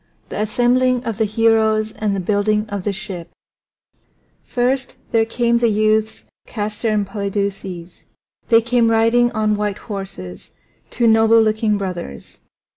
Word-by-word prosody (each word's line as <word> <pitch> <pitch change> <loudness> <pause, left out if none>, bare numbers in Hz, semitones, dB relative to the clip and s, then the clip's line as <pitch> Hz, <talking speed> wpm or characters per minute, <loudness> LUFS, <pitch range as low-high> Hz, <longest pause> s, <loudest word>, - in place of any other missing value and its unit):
THE - - -5
ASSEMBLING 245 +3 +2
OF 225 -3 -4
THE 220 - +3
HEROES 220 0 +2
AND 210 -2 -2
THE - - -2
BUILDING 210 +3 0
OF 200 -2 -4
THE 205 - +1
SHIP 185 -4 -7 1.1
First 255 +1 -1
there 225 -1 +3
came 235 +1 +1
the 235 -1 +2
youths 215 +1 0 0.2
Castor 215 +1 -3
and 210 -1 +1
Polydeuces. 195 -3 -4 0.4
They 230 0 +5
came 235 -1 +2
riding 230 +2 +3
on 215 -1 +1
white 210 -1 -2
horses, 195 - -8 0.4
two 240 - -1
noble 225 0 +5
looking 215 -1 +1
brothers. 180 - -7
215 Hz, 135 wpm, -19 LUFS, 200-230 Hz, 1.1 s, They